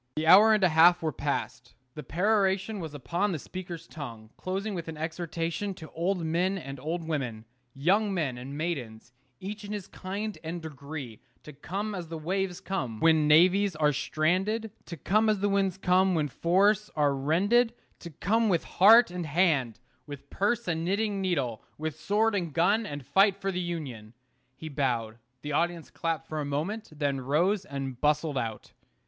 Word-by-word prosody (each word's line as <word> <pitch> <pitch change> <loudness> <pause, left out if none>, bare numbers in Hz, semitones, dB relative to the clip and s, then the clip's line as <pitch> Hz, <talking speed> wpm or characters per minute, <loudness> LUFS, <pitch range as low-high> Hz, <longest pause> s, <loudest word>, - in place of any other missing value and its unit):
The 155 - -1
hour 200 +7 +8
and 215 -2 +3
a 185 - +5
half 170 +2 +5
were 160 - 0
passed. 125 -3 -4 0.2
The 150 - -7
peroration 195 - +1
was 160 -4 -6
upon 170 +10 -1
the 170 - -2
speaker's 175 +1 -8
tongue, 115 -7 -9
closing 195 +3 -3
with 170 -3 -5
an 160 -1 -6
exhortation 165 +4 -3
to 160 -3 -11
old 175 +1 -1
men 180 +4 0
and 135 -6 -7
old 160 +4 -4
women, 125 -8 -3 0.3
young 195 +9 +2
men 155 -9 -1
and 130 +3 -7
maidens, 125 -8 -4 0.3
each 210 +3 -6
in 205 - -7
his 205 -3 -5
kind 200 +3 -5
and 165 +2 -4
degree, 140 -6 -8 0.2
to 150 - -11
come 195 +9 -4
as 180 -4 -5
the 165 0 -6
waves 180 +3 -2
come 130 - -4
when 160 -2 +4
navies 185 +5 +5
are 150 -1 +2
stranded 195 +11 0 0.2
to 170 - -7
come 215 +9 +2
as 210 -2 +1
the 205 +1 +1
winds 195 -2 +1
come 185 0 +3
when 155 -2 +1
forests 195 +8 +2
are 145 -2 +2
rended 200 - +2 0.3
to 170 - -8
come 215 +8 +1
with 175 -4 +1
heart 220 +2 +6
and 175 -2 -4
hand, 140 - +1 0.3
with 140 -1 -10
purse 215 +3 0
and 165 -1 -1
knitting 200 +2 0
needle, 140 - -1 0.2
with 155 0 -4
sword 210 +6 +1
and 175 -6 -2
gun, 200 +7 +2
and 145 -2 -7
fight 195 +4 +4
for 195 0 -2
the 180 -1 -2
Union. 130 -11 -6 0.4
He 160 - -8
bowed: 120 -6 -2 0.2
the 150 - -4
audience 170 +2 -1
clapped 165 -3 -3
for 155 - -4
a - - -1
moment, 160 +11 -3
then 145 -3 -2
rose 175 +9 +1
and 135 -4 -6
bustled 150 -1 +1
out. 115 -3 -5
170 Hz, 180 wpm, -28 LUFS, 145-195 Hz, 0.4 s, hour